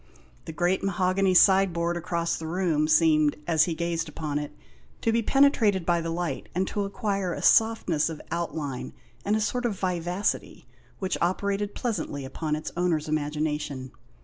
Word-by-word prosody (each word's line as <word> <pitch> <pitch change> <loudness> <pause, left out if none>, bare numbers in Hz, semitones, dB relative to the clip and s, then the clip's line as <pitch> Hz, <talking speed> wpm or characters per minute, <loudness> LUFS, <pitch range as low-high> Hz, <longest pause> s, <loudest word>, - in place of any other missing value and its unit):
The - - -6
great 175 +3 0
mahogany 185 0 +1
side 190 0 +6
board 170 +1 -1
across 170 0 -1
the 160 - -6
room, 165 -3 +1
seemed, 155 -2 +4
as 160 -2 +3
he 170 - -2
gazed 165 -1 -2
upon 150 -1 -3
it, 150 0 -5 0.5
to 225 - +2
be 230 +1 +2
penetrated 225 - +3
by 170 -1 +2
the 165 - -3
light, 165 -4 -3
and 185 +1 0
to 205 -1 -2
acquire 195 -3 -2
a - - -6
softness 220 -9 +3
of 160 - -6
outline, 155 -6 -4 0.3
and 205 - +1
a - - +1
sort 230 +4 -1
of 225 -5 -1
vivacity, 180 +1 -2 0.3
which 190 -1 -2
operated 200 +3 -1
pleasantly 165 - -3
upon 150 +3 -3
its 155 - -5
owner's 170 -3 0
imagination. 150 -3 -2
170 Hz, 165 wpm, -26 LUFS, 155-195 Hz, 0.5 s, side